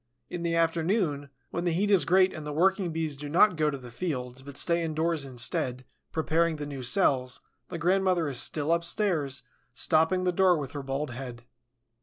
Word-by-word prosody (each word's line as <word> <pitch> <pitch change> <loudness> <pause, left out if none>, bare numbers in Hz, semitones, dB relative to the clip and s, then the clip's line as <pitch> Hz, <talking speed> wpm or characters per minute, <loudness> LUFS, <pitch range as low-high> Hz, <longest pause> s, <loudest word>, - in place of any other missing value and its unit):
In 175 - -4
the 170 -1 -1
afternoon, 165 -3 0 0.2
when 170 - -3
the 175 -2 0
heat 200 +5 +1
is 185 -8 +4
great 185 +3 +4
and 155 - -7
the 150 - -5
working 185 +3 +1
Bees 160 -2 -2
do 145 +1 -7
not 180 +5 +5
go 155 -1 +1
to 140 - -4
the 125 -2 -11
fields, 125 -4 -4
but 140 +1 -9
stay 170 0 +2
indoors 160 -1 -1
instead, 125 0 -1 0.3
preparing 160 +1 +1
the 150 -1 -5
new 140 -2 -6
cells, 130 -3 +1 0.3
the 175 - -5
grandmother 180 0 +1
is 135 -4 0
still 150 +3 +1
upstairs, 170 -5 0 0.3
stopping 160 +3 +2
the 180 - +2
door 180 -1 +3
with 140 -3 -5
her 145 - -5
bald 135 +1 -3
head. 120 -1 -8
160 Hz, 190 wpm, -28 LUFS, 140-175 Hz, 0.3 s, not